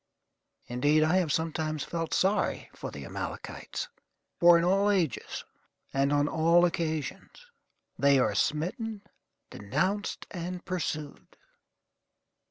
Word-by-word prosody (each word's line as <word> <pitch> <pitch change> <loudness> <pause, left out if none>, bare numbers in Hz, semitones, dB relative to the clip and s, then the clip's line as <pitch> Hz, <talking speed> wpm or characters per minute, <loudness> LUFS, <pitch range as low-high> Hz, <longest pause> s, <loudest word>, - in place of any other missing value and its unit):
Indeed, 145 +6 +2
I 160 +4 +3
have 175 -5 +1
sometimes 155 -1 -1
felt 165 -1 -3
sorry 195 +3 +1
for - - -6
the - - -8
Amalekites, - - -5 0.5
for 175 0 +8
in 170 - +1
all 195 +3 +3
ages, 175 - -1 0.5
and 135 +1 +2
on 145 0 +3
all 165 +3 +4
occasions, 165 - -3 0.5
they 140 0 +5
are 110 -5 +2
smitten, 195 - -1 0.5
denounced, 190 - -1
and 180 +1 -5
pursued. 155 -5 -4
165 Hz, 110 wpm, -29 LUFS, 150-185 Hz, 0.5 s, for